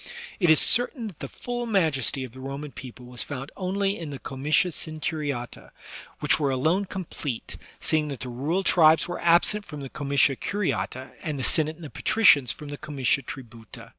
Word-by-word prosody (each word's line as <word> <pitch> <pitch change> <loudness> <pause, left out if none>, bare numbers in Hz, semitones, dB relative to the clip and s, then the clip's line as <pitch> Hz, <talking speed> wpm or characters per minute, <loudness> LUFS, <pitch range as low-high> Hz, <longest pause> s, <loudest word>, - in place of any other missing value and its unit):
It 175 -4 +3
is 160 - +7
certain 245 0 +5
that 195 -8 -8
the - - -5
full 240 -1 -5
majesty 150 - +1
of 130 - -8
the 130 - -13
Roman 140 +2 -6
people 125 -2 -10
was 125 -1 -5
found 140 -1 -6
only 195 +2 -1
in 165 -3 -6
the 140 - -6
comitia 145 +7 0
centuriata^ 150 -6 -4 0.5
which 150 +2 +3
were 145 -2 +1
alone 160 +10 +1
complete, 165 - -5 0.2
seeing 155 -1 +1
that 140 -4 -6
the 125 - -4
rural 150 +10 -1
tribes 160 -4 +5
were 175 - -5
absent 175 +5 +4
from 150 -6 -9
the 135 - -7
comitia 140 -1 +2
curiata 180 -9 -2
and 150 -3 -3
the 130 - -3
Senate 155 0 +2
and 165 0 -11
the 145 - -9
patricians 150 - +4
from 150 -1 -9
the 145 - -6
comitia 140 -3 0
tributa. 115 -2 -10
150 Hz, 185 wpm, -26 LUFS, 135-175 Hz, 0.5 s, is